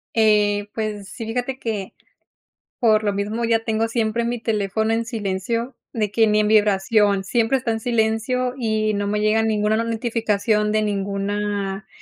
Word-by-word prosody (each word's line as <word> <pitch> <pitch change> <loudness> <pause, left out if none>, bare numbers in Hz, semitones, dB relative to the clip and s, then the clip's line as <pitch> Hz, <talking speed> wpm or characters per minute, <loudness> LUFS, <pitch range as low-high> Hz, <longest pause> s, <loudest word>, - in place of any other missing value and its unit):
Eh, 210 -2 +3
pues 210 -3 -4
sí, 225 - -7
fíjate 245 +3 -3
que, 215 -6 -4 0.9
por 220 -3 +4
lo 205 - +1
mismo 210 +4 -2
ya 225 -1 +1
tengo 225 0 0
siempre 230 0 -1
mi 240 0 -2
teléfono 220 0 0
en 230 0 0
silencio, 230 +2 -3 0.2
de 210 -3 -1
que 225 +1 +3
ni 215 0 +3
en 210 - +1
vibración, 205 -1 +3
siempre 235 +5 +1
está 245 -3 -2
en 225 - -2
silencio 235 +2 0
y 215 -2 0
no 200 0 -1
me 210 +1 0
llega 215 +1 +3
ninguna 215 -1 +1
notificación 225 -2 0
de 215 - +2
ninguna 200 0 -2
215 Hz, 160 wpm, -22 LUFS, 205-230 Hz, 0.9 s, por